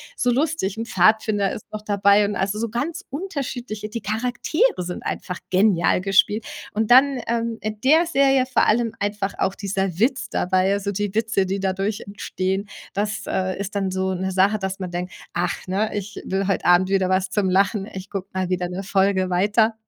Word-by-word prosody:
so 245 - +1
lustig, 275 -7 0
'n 225 - -3
Pfadfinder 205 +1 +3
ist 215 - -8
noch 215 0 -5
dabei 200 0 +4
und 205 0 -2
also, 195 +2 -1
so 230 +1 -2
ganz 320 - -3
unterschiedliche 255 - -4
die 230 +2 -5
Charaktere 245 - 0
sind 180 0 -6
einfach 180 - -4
genial 185 -2 +3
gespielt. 200 +3 +3 0.3
Und 220 0 0
dann, 265 +2 +6
ähm, 230 -1 -1
in 215 0 -4
der 315 +6 +4
Serie 270 -4 +3
vor 260 - +2
allem 225 0 +2
einfach 205 0 -2
auch 190 - 0
dieser 195 -3 -2
Witz 240 0 +1
dabei, 185 0 +1
also, 200 0 -1
die 205 0 -2
Witze, 220 -3 +1
die 195 +1 -2
dadurch 195 +2 -1
entstehen. 195 0 -3 0.3
Das, 210 +1 -2
äh, 185 +1 -1
ist 200 +1 -5
dann 195 -2 0
so 190 0 -1
'ne 190 +1 -2
Sache, 195 +3 +3
dass 190 -1 -4
man 185 -1 -4
denkt: 180 +1 -4 0.2
„Ach, 175 - -2
ne, 200 +4 0
ich 205 0 -5
will 190 0 -1
heut 195 - 0
Abend 180 +1 +5
wieder 190 -1 +2
was 185 0 +1
zum 190 -1 0
Lachen. 195 +2 +2
Ich 190 +1 -7
guck 195 -1 -6
mal 185 -1 -1
wieder 180 -1 -1
'ne 185 +2 -5
Folge 190 -1 +1
weiter.“ 210 +5 +2
200 Hz, 195 wpm, -22 LUFS, 190-220 Hz, 0.3 s, dann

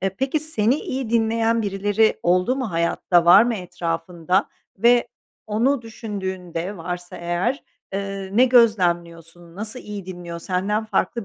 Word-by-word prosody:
E, 195 - +1
peki, 265 - -1
seni 255 -6 +1
iyi 260 -3 -4
dinleyen 230 0 +1
birileri 205 +2 +1
oldu 180 +9 +2
mu 255 -7 -3
hayatta, 170 +1 +1
var 180 +5 +8
mı 235 -1 0
etrafında? 175 0 -2 0.3
Ve 240 +2 +4 0.4
onu 235 +5 +1
düşündüğünde 190 -4 -5
varsa 175 +1 -6
eğer, 175 - -1 0.3
eee, 195 -1 -4
ne 245 +5 +5
gözlemliyorsun, 175 -8 +1
nasıl 215 +4 -4
iyi 205 -3 -8
dinliyor, 175 -2 -7
senden 195 +5 -1
farklı 225 0 -1
195 Hz, 135 wpm, -22 LUFS, 175-225 Hz, 0.4 s, var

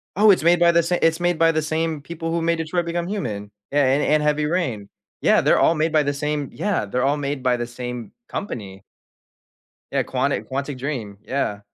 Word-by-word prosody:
Oh, 210 +2 +5
it's 185 - +5
made 170 +1 +5
by 170 0 +6
the 170 - +4
sa 175 +2 0
it's 165 +1 +3
made 175 -2 +1
by 165 0 +5
the 155 - +1
same 160 0 -1
people 165 +2 -5
who 170 - 0
made 165 0 +1
Detroit: 170 +2 -1
Become 170 +1 -2
Human. 105 - -4 0.2
Yeah, 145 -1 +3
and 135 +3 +2
and 150 0 +3
Heavy 150 0 +1
Rain. 130 - -2 0.3
Yeah, - - +4
they're - - +3
all 165 - +4
made 155 +1 0
by 155 -1 +4
the 145 0 0
same 145 -1 -2
Yeah, 200 - -1
they're 125 +5 -1
all 140 +2 +2
made 140 -1 -3
by 125 -1 +3
the 120 0 -3
same 125 -2 -6 0.2
company. 100 - -6 1.1
Yeah, - - +1
Quantic - - -1
Quantic 140 +1 -3
Dream, 125 -7 -4
yeah, 130 -7 -1
150 Hz, 215 wpm, -22 LUFS, 130-170 Hz, 1.1 s, by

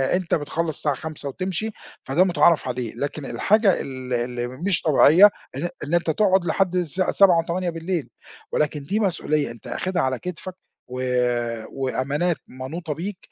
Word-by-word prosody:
أنت 180 -2 0
بتخلص 160 +1 -2
الساعة 145 -2 0
17:00 150 -1 -6
وتمشي، 190 +8 -3 0.3
فده 145 +8 +3
متعارف 170 -4 +3
عليه، 125 -3 -3
لكن 145 0 -4
الحاجة 210 +2 +2
ال 130 -1 -6
اللي 120 0 -2
مش 165 +9 -1
طبيعية 160 +6 +7 0.3
إن 175 +5 -2
إن 150 +3 -4
أنت 175 -1 +2
تقعد 190 +1 +2
لحد 180 +2 +1
الساعة 180 +1 0
19:00 190 -4 +6
و22:00، 170 -1 -2 0.4
ولكن 150 -1 0
دي 200 +10 -1
مسؤولية 155 - 0
أنت 115 - -12
آخدها 185 -2 -1
على 130 -2 0
كتفَك 180 +1 -6 0.3
و 125 +1 -5 0.7
وأمانات 140 +6 -1
منوطة 150 +6 -5
بيك، 180 +6 -5
160 Hz, 150 wpm, -23 LUFS, 140-180 Hz, 0.7 s, طبيعية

